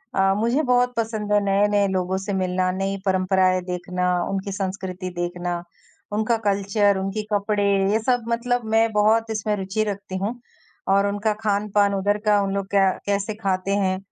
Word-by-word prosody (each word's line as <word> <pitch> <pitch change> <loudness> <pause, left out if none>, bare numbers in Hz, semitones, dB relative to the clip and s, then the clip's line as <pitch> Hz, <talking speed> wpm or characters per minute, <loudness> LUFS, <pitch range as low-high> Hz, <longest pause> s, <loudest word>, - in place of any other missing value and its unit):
अ, 195 0 +3
मुझे 235 +7 +1
बहुत 250 -1 +2
पसंद 220 -2 -2
है 205 - +5
नए-नए 200 0 +2
लोगों 185 0 -1
से 195 +1 -4
मिलना, 185 -1 0
नई 195 +1 -2
परंपराएँ 185 -1 +2
देखना, 180 0 -2 0.2
उनकी 195 0 -3
संस्कृति 190 -1 -4
देखना, 175 0 -3 0.5
उनका 220 +2 +1
कल्चर, 200 0 +2
उनके 195 +3 -2
कपड़े, 205 0 +1 0.3
ये 220 - +2
सब 245 -2 +1
मतलब 240 0 0
मैं 225 0 +4
बहुत 220 +2 +2
इसमें 215 -1 -1
रुचि 195 +3 -1
रखती 200 -2 -4
हूँ 215 +6 -3 0.5
और 200 +1 +3
उनका 205 +1 0
खान-पान 205 -1 +2
उधर 205 +1 +1
का 210 -1 +4
उन 195 -1 -1
लोग 195 -1 -2
क्या 195 -1 +4 0.2
कैसे 205 +1 -1
खाते 195 -1 -1
हैं, 190 -2 +1
200 Hz, 165 wpm, -23 LUFS, 190-215 Hz, 0.5 s, है